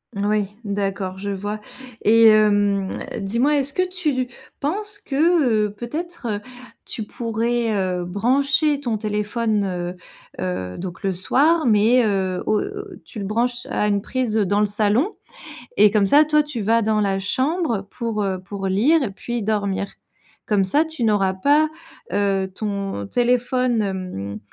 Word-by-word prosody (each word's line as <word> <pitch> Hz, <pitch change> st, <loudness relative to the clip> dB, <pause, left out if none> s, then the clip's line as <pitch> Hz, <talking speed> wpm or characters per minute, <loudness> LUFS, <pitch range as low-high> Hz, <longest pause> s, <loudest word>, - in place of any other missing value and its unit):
Oui, 205 Hz, 0 st, 0 dB
d'accord, 195 Hz, -2 st, -2 dB
je 200 Hz, +1 st, -4 dB
vois 205 Hz, +2 st, -4 dB, 0.4 s
et 225 Hz, +1 st, +6 dB
hem, 205 Hz, -2 st, +4 dB, 0.3 s
dis-moi, 235 Hz, +9 st, +1 dB
est-ce 275 Hz, 0 st, -2 dB
que 370 Hz, +3 st, +1 dB
tu 360 Hz, -4 st, -1 dB
lu 255 Hz, -2 st, -1 dB, 0.3 s
penses 410 Hz, +8 st, -3 dB
que, 280 Hz, -, -6 dB
heu, 270 Hz, -, +3 dB
peut-être, 315 Hz, +6 st, -5 dB
heu, 205 Hz, -1 st, -1 dB, 0.5 s
tu 220 Hz, -, -5 dB
pourrais, 230 Hz, +1 st, -1 dB
heu, 185 Hz, -3 st, -1 dB
brancher 275 Hz, -, +2 dB
ton 240 Hz, -6 st, -2 dB
téléphone, 210 Hz, 0 st, -1 dB
heu, 180 Hz, -1 st, -3 dB, 0.4 s
heu, 90 Hz, 0 st, -3 dB
donc 185 Hz, 0 st, -6 dB
le 195 Hz, -1 st, 0 dB
soir 300 Hz, -, +2 dB
mais 230 Hz, +2 st, +4 dB
heu, 190 Hz, -3 st, 0 dB
au 215 Hz, -, +2 dB, 0.4 s
tu -, -, -12 dB
le 200 Hz, -, -3 dB
branches 240 Hz, +4 st, -1 dB
à 210 Hz, -, +1 dB
une 200 Hz, -1 st, +1 dB
prise 250 Hz, -4 st, -1 dB
dans 205 Hz, -1 st, +2 dB
le 210 Hz, -, +3 dB
salon? 215 Hz, -, +1 dB, 0.6 s
Et 210 Hz, -, +6 dB
comme 205 Hz, -2 st, +3 dB
ça, 295 Hz, +7 st, +6 dB
toi, 300 Hz, 0 st, +4 dB
tu 295 Hz, -6 st, -5 dB
vas 225 Hz, +3 st, +3 dB
dans 215 Hz, 0 st, +1 dB
la 195 Hz, -1 st, +1 dB
chambre 255 Hz, -, -1 dB
pour, 230 Hz, -4 st, -2 dB
heu, 190 Hz, -2 st, -1 dB
pour 195 Hz, +1 st, -6 dB
lire 260 Hz, +12 st, +3 dB
et 220 Hz, -, -2 dB
puis 235 Hz, +3 st, -4 dB
dormir. 200 Hz, -2 st, -1 dB, 0.6 s
Comme 205 Hz, -2 st, +3 dB
ça 285 Hz, +12 st, +3 dB
tu 315 Hz, -6 st, -5 dB
n'auras 205 Hz, -4 st, +2 dB
pas, 290 Hz, +10 st, +3 dB, 0.4 s
heu, 195 Hz, -2 st, 0 dB
ton 200 Hz, -, -3 dB
téléphone, 245 Hz, -, +1 dB
hem, 180 Hz, -, -4 dB
215 Hz, 155 wpm, -22 LUFS, 195-255 Hz, 0.6 s, et